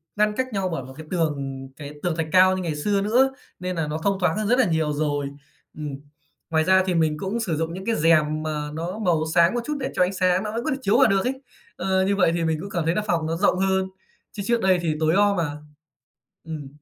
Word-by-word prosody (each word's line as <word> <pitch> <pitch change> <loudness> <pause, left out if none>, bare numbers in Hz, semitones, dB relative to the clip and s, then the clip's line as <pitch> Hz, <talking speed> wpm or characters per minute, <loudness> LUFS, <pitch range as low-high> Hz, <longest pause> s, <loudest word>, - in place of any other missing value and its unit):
ngăn 210 0 +2
cách 260 0 0
nhau 190 -2 -1
bởi 165 -6 -3
một 130 +1 -11
cái 160 - -9
tường 140 -6 -2
cái 145 -1 -8
tường 175 -3 0
thạch 165 -1 -2
cao 185 0 +5
như 185 - -3
ngày 160 -3 -2
xưa 200 +6 0
nữa, 250 +6 +3 0.3
nên 180 0 -3
nà 160 -2 -1
nó 150 +1 -2
thông 195 -1 +1
thoáng 180 +1 +1
hơn 215 -1 -1
rất 245 +3 +3
là 255 - +5
nhiều 160 -3 0
rồi. 145 -1 -1 0.5
Ừm, 150 -3 -5 0.5
ngoài 160 -1 +2
ra 190 +2 +4
thì 185 - 0
mình 155 -2 +2
cũng 200 +4 -2
sử 175 -9 -1
dụng 165 +1 -2
những 190 +2 -7
cái 230 -1 +1
rèm 155 -1 +3
mà 150 -1 -3
nó 175 +6 -4
màu 175 -6 +1
sáng 170 +3 +5
một 240 - 0
chút 300 -1 -2
để 260 - -3
cho 180 - +4
ánh 185 +2 0
sáng 185 +1 +2
nó 210 - -3
vẫn 230 +2 -3
có - - 0
thể 265 - -1
chiếu 210 0 +3
vào 265 -3 +6
được 195 -2 +2
ấy. 265 +1 -2 0.3
Ờ, 190 +1 +1
như 200 +1 +1
vậy 180 -4 +3
thì 170 -1 -1
mình 160 -1 +1
cũng 200 - -7
cảm 170 -4 -2
thấy 165 - +1
là 215 - +1
phòng 165 -3 +1
nó 165 +1 -2
rộng 185 -1 +2
hơn, 190 0 +1 0.4
chứ 200 - -6
trước 235 0 +1
đây 185 -2 +3
thì 160 -3 0
tối 160 +1 +2
om 200 0 +3
à. 150 -2 -2 0.9
Ừm. 155 -3 -6
180 Hz, 270 wpm, -24 LUFS, 155-200 Hz, 0.9 s, vào